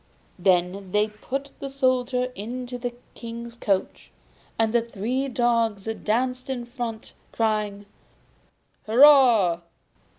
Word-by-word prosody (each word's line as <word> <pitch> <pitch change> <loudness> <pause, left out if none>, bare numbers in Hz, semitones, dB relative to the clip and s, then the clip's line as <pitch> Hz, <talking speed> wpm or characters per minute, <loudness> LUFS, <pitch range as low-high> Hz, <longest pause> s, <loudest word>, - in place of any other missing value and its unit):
Then 185 +1 +1
they 210 +1 +2
put 270 +6 -5
the 275 - -5
Soldier 255 -2 0
into 245 +4 -6
the 245 0 -4 0.2
King's 235 0 -8
coach, 200 -5 -2 0.5
and 225 0 +1
the 235 - +4
three 235 +4 -2
dogs 230 -5 +1 0.2
danced 255 +4 -1
in 245 -2 -3
front, 240 -2 -6 0.2
crying 210 -2 -1 1.0
'Hurrah! 235 - +6
235 Hz, 105 wpm, -25 LUFS, 210-255 Hz, 1.0 s, Hurrah